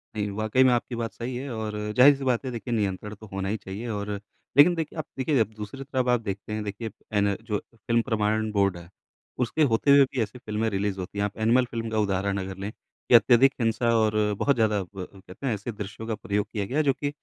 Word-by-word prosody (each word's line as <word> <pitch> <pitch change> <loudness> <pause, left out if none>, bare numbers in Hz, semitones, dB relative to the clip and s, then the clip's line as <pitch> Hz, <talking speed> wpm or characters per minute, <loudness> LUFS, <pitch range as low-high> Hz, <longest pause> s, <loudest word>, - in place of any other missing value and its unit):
नहीं, 105 -1 -1
वाक़ई 110 +4 +3
में 130 - +5
आपकी 120 0 -1
बात 115 -1 -3
सही 120 +1 -5
है 135 +2 -5
और 110 -1 -4 0.2
ज़ाहिर-सी 140 +1 +7
बात 130 0 +1
है। 130 - -3
देखिए 120 0 -4
नियंत्रण 105 -1 -2
तो 110 +1 -13
होना 95 0 -2
ही 110 - -1
चाहिए 100 +4 -7
और 105 -1 -3 0.5
लेकिन 165 +5 +8
देखिए 160 0 -4
आप 155 - -3
देखिए 135 +1 +1
अब 110 -1 +1
दूसरों 105 +6 -7 0.2
को 125 - -2
आप 120 - +3
देखते 100 0 -5
हैं 110 0 -2
देखिए 105 +2 -5 0.2
हैं 105 - +3
ना 100 -1 +2
जो 105 -2 -2 0.2
फ़िल्म 115 +1 +1
प्रमाणन 110 -2 0
बोर्ड 100 -3 +2
है। 85 -1 -12 0.5
उसके 125 +6 0
होते 140 +5 +3
हुए 140 - +8
भी 130 -2 -3
ऐसी 125 +3 -4
फ़िल्में 110 0 -1
रिलीज़ 100 -1 -2
होती 95 +2 -6
हैं। 100 - +1
आप 105 - -5
एनिमल 120 +3 +4
फ़िल्म 115 -2 -4
का 110 - -2
उदाहरण 100 -1 0
अगर 95 0 -5
लें। 100 +2 -4 0.4
कि - - +8
अत्यधिक 120 +4 +6
हिंसा 115 +1 +1
और 110 -1 +2 0.3
बहुत 140 - +3
ज़्यादा 110 -3 +2
ब 95 0 -8
कहते 95 +6 -11
हैं 120 - +1
ऐसे 105 +3 -4
दृश्यों 105 +1 -7
का 110 - -1
प्रयोग 105 -1 -1
किया 105 -2 -1
गया 130 +8 -3
है 155 - +4
जो 140 - +3
कि 145 +2 -3
110 Hz, 245 wpm, -26 LUFS, 100-125 Hz, 0.5 s, लेकिन